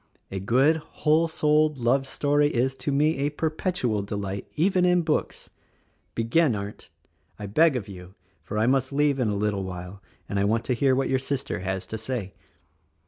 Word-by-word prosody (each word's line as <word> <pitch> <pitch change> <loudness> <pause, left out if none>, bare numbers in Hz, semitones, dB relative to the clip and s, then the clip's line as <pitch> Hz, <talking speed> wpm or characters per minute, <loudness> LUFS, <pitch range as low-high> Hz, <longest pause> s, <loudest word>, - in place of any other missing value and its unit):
A 95 - -3
good, 130 - +3
whole 155 +1 +1
souled, 155 -1 +2
love 135 +3 +1
story 145 +1 +2
is, 130 0 0
to 145 - -3
me, 150 +3 +2
a 140 +1 +1
perpetual 155 - -1
delight, 100 -1 -4
even 180 +3 +2
in 180 -1 +3
books. 155 -1 -2 0.6
Begin 115 +4 +2
Arndt! 100 +1 -7 0.5
I 105 - -6
beg 150 +9 +3
of 115 -4 -3
you, 90 -1 -11 0.3
for 105 - -6
I 110 - +2
must 130 +1 +1
leave 145 -1 +2
in 125 - +1
a 105 - -1
little 100 -1 -1
while 90 +1 -7 0.3
and 100 - -2
I - - +2
want 110 +3 +1
to 125 - +1
hear 130 +2 +2
what 135 - 0
your 130 0 +2
sister 140 -4 -3
has 95 0 -3
to 110 +3 -6
say." 110 -4 -4
130 Hz, 185 wpm, -25 LUFS, 100-150 Hz, 0.6 s, good